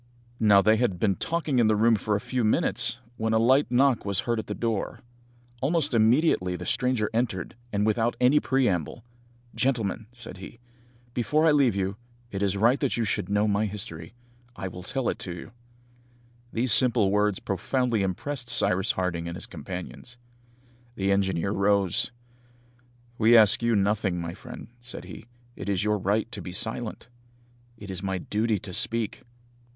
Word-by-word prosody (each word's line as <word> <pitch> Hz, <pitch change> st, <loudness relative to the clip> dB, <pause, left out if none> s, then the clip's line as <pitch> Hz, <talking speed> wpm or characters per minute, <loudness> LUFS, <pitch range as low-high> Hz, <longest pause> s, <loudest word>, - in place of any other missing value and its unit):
Now, 105 Hz, -3 st, +5 dB
they 110 Hz, +2 st, +4 dB
had 110 Hz, -6 st, 0 dB
been 100 Hz, -3 st, +2 dB
talking 160 Hz, -, -1 dB
in 115 Hz, -, +4 dB
the 110 Hz, -, +3 dB
room 115 Hz, +2 st, +4 dB
for 105 Hz, 0 st, -1 dB
a -, -, 0 dB
few 125 Hz, +3 st, -2 dB
minutes, 110 Hz, +2 st, +1 dB, 0.2 s
when 110 Hz, 0 st, 0 dB
a -, -, +4 dB
light 130 Hz, +4 st, +4 dB
knock 130 Hz, 0 st, +3 dB
was 100 Hz, -1 st, -1 dB
heard 120 Hz, -2 st, -1 dB
at -, -, -6 dB
the -, -, -4 dB
door. 115 Hz, -4 st, -2 dB, 0.6 s
Almost 150 Hz, 0 st, +1 dB
immediately 110 Hz, -, +3 dB
the 90 Hz, 0 st, -7 dB
stranger 125 Hz, 0 st, 0 dB
entered, 110 Hz, -7 st, -1 dB, 0.2 s
and 105 Hz, 0 st, 0 dB
without 115 Hz, +2 st, +1 dB
any 130 Hz, +4 st, +5 dB
preamble, 120 Hz, -, 0 dB, 0.5 s
"Gentlemen," 115 Hz, -4 st, -1 dB
said 120 Hz, -6 st, -7 dB
he, 95 Hz, +5 st, -10 dB, 0.6 s
"before 150 Hz, +6 st, +1 dB
I 160 Hz, -, +6 dB
leave 135 Hz, -7 st, +3 dB
you, 95 Hz, 0 st, -2 dB, 0.3 s
it 100 Hz, -, -4 dB
is 100 Hz, -1 st, +1 dB
right 120 Hz, +7 st, +3 dB
that 140 Hz, -4 st, 0 dB
you 115 Hz, -, +1 dB
should 100 Hz, -3 st, -1 dB
know 105 Hz, +1 st, +2 dB
my 105 Hz, +1 st, +1 dB
history. 95 Hz, -3 st, -7 dB, 0.4 s
I 95 Hz, -, -5 dB
will 90 Hz, 0 st, -8 dB
tell 130 Hz, +7 st, -3 dB
it -, -, -2 dB
you." 90 Hz, +5 st, -7 dB, 1.0 s
These 120 Hz, +1 st, 0 dB
simple 120 Hz, -6 st, +4 dB
words 105 Hz, -1 st, +2 dB
profoundly 120 Hz, +3 st, -1 dB
impressed 120 Hz, +7 st, -3 dB
Cyrus 95 Hz, -4 st, +1 dB
Harding 85 Hz, -2 st, -2 dB
and 85 Hz, -, -5 dB
his -, -, -6 dB
companions. 90 Hz, -, -8 dB, 0.8 s
The 100 Hz, 0 st, 0 dB
engineer 95 Hz, -1 st, +1 dB
rose. 100 Hz, +2 st, +2 dB, 1.1 s
"We 115 Hz, +2 st, +6 dB
ask 110 Hz, +2 st, +6 dB
you 115 Hz, -1 st, +2 dB
nothing, 100 Hz, -2 st, +1 dB
my 85 Hz, 0 st, -4 dB
friend," 120 Hz, +6 st, -10 dB
said 120 Hz, -6 st, -7 dB
he, 90 Hz, +4 st, -11 dB, 0.3 s
"it -, -, -6 dB
is 95 Hz, -2 st, 0 dB
your 105 Hz, 0 st, +1 dB
right 105 Hz, +4 st, +1 dB
to 105 Hz, -4 st, -6 dB
be 90 Hz, -, -7 dB
silent." 110 Hz, +2 st, -2 dB, 0.7 s
"It 100 Hz, -3 st, -8 dB
is 95 Hz, -1 st, -4 dB
my 95 Hz, -1 st, -2 dB
duty 110 Hz, +4 st, 0 dB
to 95 Hz, 0 st, -8 dB
speak." 115 Hz, +2 st, -1 dB
110 Hz, 170 wpm, -26 LUFS, 95-120 Hz, 1.1 s, I